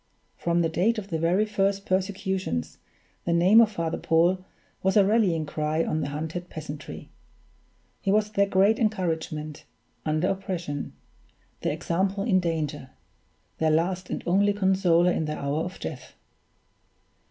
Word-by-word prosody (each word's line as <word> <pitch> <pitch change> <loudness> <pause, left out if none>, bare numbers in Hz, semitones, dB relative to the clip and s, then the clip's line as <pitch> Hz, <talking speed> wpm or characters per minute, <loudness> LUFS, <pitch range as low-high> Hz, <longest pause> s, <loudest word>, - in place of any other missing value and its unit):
From 170 0 0
the 165 - +2
date 190 +8 +1
of 200 -2 -5
the 165 -3 -2
very 175 +6 +2
first 200 -1 0
persecutions 190 - -2 0.4
the 170 - 0
name 185 +7 +6
of 220 -2 +3
Father 165 -5 -2
Paul 175 +3 +2 0.4
was 190 +2 +2
a 200 - +6
rallying 195 -7 +2
cry 155 +2 -1
of 155 - -1
the - - -2
hunted 160 +4 -5
peasantry; 150 -1 -8 0.9
he 195 - 0
was 210 +1 +2
their 200 -1 +2
great 195 +3 +3
encouragement 160 -8 -2 0.4
under 155 +3 0
oppression, 180 -7 -3 0.7
their - - 0
example 190 +3 -1
in 195 -5 +3
danger, 155 -6 -2 0.7
their 160 - +2
last 180 +4 0
and - - -4
only 200 +3 +3
consoler 190 -3 +3
in 160 - -1
the 150 0 -3
hour 140 +2 -1
of 180 - -8
death. - - -7
180 Hz, 145 wpm, -26 LUFS, 160-195 Hz, 0.9 s, name